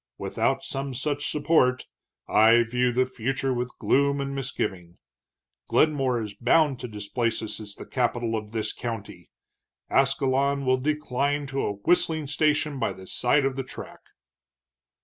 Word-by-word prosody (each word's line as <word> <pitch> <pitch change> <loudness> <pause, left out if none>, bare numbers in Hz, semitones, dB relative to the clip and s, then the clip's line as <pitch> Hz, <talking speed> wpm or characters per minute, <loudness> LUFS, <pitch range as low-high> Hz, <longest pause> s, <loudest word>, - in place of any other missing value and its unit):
Without - - -1
some 135 -1 -4
such 145 +2 -2
support, 145 -5 +2 0.4
I 115 +2 +6
view 125 +2 +1
the 130 +2 +2
future 130 +2 -2
with 125 0 -4
gloom 140 +1 +2
and 140 0 -3
misgiving. 95 -10 -4 0.7
Glenmore 135 -6 +2
is 105 -2 -6
bound 135 +3 +2
to - - -5
displace 110 +2 -2
us 110 - -4
as 105 -2 -8
the - - -9
capital 120 -2 -1
of 105 -1 -4
this 110 -1 -2
county; 105 -7 -6 0.6
Ascalon 135 +1 +2
will 130 0 +3
decline 145 0 -1
to 135 0 -2
a 105 - -1
whistling 160 - +1
station 150 0 +1
by 115 - 0
the 95 - -12
side 130 +8 +2
of 135 -1 0
the 135 - -3
track." 130 - -9
130 Hz, 150 wpm, -26 LUFS, 115-140 Hz, 0.7 s, I